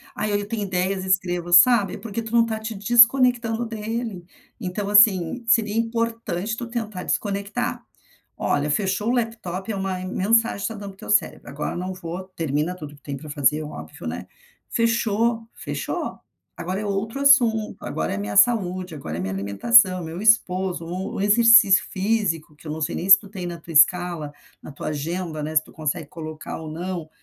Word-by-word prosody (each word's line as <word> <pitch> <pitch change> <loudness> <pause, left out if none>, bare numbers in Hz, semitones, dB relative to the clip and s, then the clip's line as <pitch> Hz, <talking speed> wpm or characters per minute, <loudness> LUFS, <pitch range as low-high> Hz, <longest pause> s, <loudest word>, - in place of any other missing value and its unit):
"Ai 215 -1 -2
ai, 205 - 0
eu 205 - -7
tenho 215 -1 -3
ideias 185 0 -1
e - - -7
escrevo", 180 -2 0
sabe. 205 +3 +6
É - - -8
porque 230 0 -5
tu 225 -1 -8
não 235 -1 +5
está 220 -1 -3
te 220 +1 -5
desconectando 235 +2 +4
dele. 225 -3 -5 0.3
Então 200 0 -4
assim, 205 0 +4
seria 220 -2 +2
importante 230 -3 -2
tu 240 - -5
tentar 220 -6 -5
desconectar. 200 0 -3 0.5
Olha, 145 +1 0
fechou 200 +5 0
o - - +2
laptop 225 -5 -3
é - - -3
uma 190 -1 -3
mensagem 225 +5 +1
que - - -8
está 225 - -2
dando 200 -1 -8
para - - -18
o - - -32
teu - - -11
cérebro: 210 - 0
"Agora 145 +1 -4
eu - - -4
não 185 +1 -4
vou" 180 0 -6
termina 155 +2 -1
tudo 150 -4 -10
que 145 - -22
tem 140 -1 -5
para 155 +2 -11
fazer, 150 +2 +1
óbvio, 150 - -9
né. - - -6 0.4
Fechou, 230 0 0
fechou. - - -5 0.4
Agora 185 +4 -4
é - - -5
outro 210 +6 -3
assunto, 240 -6 +4
agora 80 0 -3
é - - -2
a - - -3
minha 105 0 -4
saúde, 185 -6 +2
agora 80 - -6
é - - -4
a - - -2
minha 95 +1 -3
alimentação, 185 - +3
meu 165 +3 -6
esposo, 185 -5 +2
ou 180 +3 -5
o - - -3
exercício 210 -1 +6
físico, 190 -6 -1
que 150 - -14
eu - - -4
não 160 +1 -5
sei 155 +3 -2
nem 185 - -4
se 195 - +11
tu 200 - -14
tem 190 -3 -6
na 170 -1 -6
tua 165 - -11
escala, 160 -1 +3 0.3
na - - -11
tua 140 - -7
agenda, 155 +2 -4
né, 155 +1 -5
se 155 - +4
tu - - -18
consegue 155 0 -3
colocar 155 -2 -7
ou 160 -1 -7
não, 170 0 -5
190 Hz, 205 wpm, -23 LUFS, 165-225 Hz, 0.5 s, se